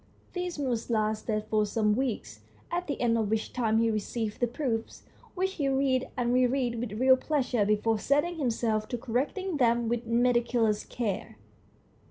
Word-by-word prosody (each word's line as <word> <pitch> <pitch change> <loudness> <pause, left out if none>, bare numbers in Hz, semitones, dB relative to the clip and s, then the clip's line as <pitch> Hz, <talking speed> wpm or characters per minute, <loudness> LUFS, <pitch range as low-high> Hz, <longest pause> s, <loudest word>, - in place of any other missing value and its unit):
This 360 -2 -3
mood 250 -6 -2
lasted 215 -1 0
for 215 -1 +2
some 210 0 +1
weeks, 215 - -3 0.3
at 355 +1 -2
the 285 - -3
end 230 -1 +2
of 215 -2 0
which 220 0 -1
time 225 -3 +2
he 230 0 +3
received 215 0 -3
the 245 - +2
proofs, 235 -2 -3 0.3
which 380 +1 0
he 285 -7 -1
read 265 -1 +1
and 245 -1 +1
re 250 0 +4
read 245 -2 -1
with 230 -3 -4
real 260 +1 +6
pleasure 260 -6 0
before 215 +1 +2
setting 295 - +1
himself 225 -5 0
to 245 - -3
correcting 290 - -2
them 235 -2 +2
with 235 0 -2
meticulous 235 -2 +2
care. 205 - -4
240 Hz, 170 wpm, -29 LUFS, 220-265 Hz, 0.3 s, real